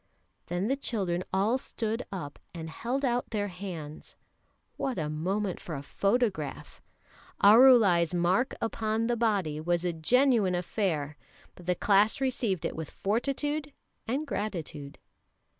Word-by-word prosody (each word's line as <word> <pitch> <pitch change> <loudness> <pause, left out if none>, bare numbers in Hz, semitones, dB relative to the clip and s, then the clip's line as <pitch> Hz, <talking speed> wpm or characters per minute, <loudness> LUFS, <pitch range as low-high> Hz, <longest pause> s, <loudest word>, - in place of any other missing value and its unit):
Then 175 +4 -1
the 270 - +2
children 190 -10 -2
all 210 +7 +2
stood 225 -1 -3
up 170 -7 -6 0.2
and 160 -1 -6
held 255 - -2
out 245 -1 0
their 205 -2 -1
hands 175 -5 -8 0.6
what 265 -2 -2
a 155 -3 -2
moment 185 +5 -2
for 165 - -6
a 140 - -6
photograph! 195 - -1 0.6
Arulai's 205 -6 +7
"mark 180 +9 +1
upon 225 0 -1
the 240 +1 +1
body" 200 -10 0
was 175 +2 0
a 175 - 0
genuine 220 - +3
affair, 165 -5 -2 0.4
but 175 - -15
the 180 - +2
class 205 +5 +3
received 240 - 0
it - - -2
with 160 -1 -5
fortitude 280 +7 -2 0.3
and 270 +7 -1
gratitude. 165 - -5
200 Hz, 135 wpm, -29 LUFS, 170-235 Hz, 0.6 s, Arulai's